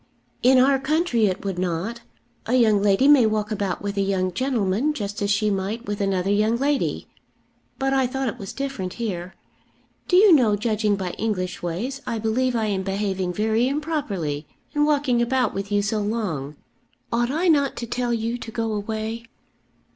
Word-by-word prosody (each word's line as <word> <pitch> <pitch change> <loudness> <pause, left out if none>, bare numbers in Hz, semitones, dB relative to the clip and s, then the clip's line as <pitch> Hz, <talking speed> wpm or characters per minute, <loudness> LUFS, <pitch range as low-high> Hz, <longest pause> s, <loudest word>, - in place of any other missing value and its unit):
"In 260 +2 +5
our 270 +1 +4
country 270 -6 +1
it 185 +1 -3
would 190 -2 -2
not. 185 +7 -2 0.5
A 245 - +2
young 220 -5 +4
lady 205 +6 +3
may 280 -6 +7
walk 215 0 -1
about 200 -2 -2
with 200 0 -3
a - - +2
young 190 -2 0
gentleman 245 - 0
just 205 -3 -4
as 200 - 0
she 210 +1 +2
might 200 +5 -3
with 205 0 -3
another 195 -1 0
young 215 +3 +2
lady; 280 +2 -1 0.7
but 270 0 0
I 265 -2 +2
thought 265 +1 -2
it 220 - -4
was 195 - -6
different 265 -10 -4
here. 190 -6 -4 0.7
Do 360 - +2
you 390 0 +7
know, 235 -8 +4
judging 215 -1 0
by 185 -2 -3
English 185 -5 -2
ways, 220 +11 -3
I 230 - -1
believe 240 +3 0
I 225 -1 +1
am 200 -3 -1
behaving 195 -1 -2
very 220 +4 +1
improperly 220 - -2 0.3
in 295 0 +2
walking 280 -5 +2
about 250 -1 +1
with 200 +1 -5
you 205 0 +2
so 215 +1 0
long. 195 -10 -3 0.6
Ought 240 +1 +1
I 325 +7 0
not 285 -4 +3
to 235 - -4
tell 240 +1 -2
you 230 +1 -1
to 230 - -7
go 225 0 -2
away?" 220 +2 -4
220 Hz, 185 wpm, -23 LUFS, 200-255 Hz, 0.7 s, may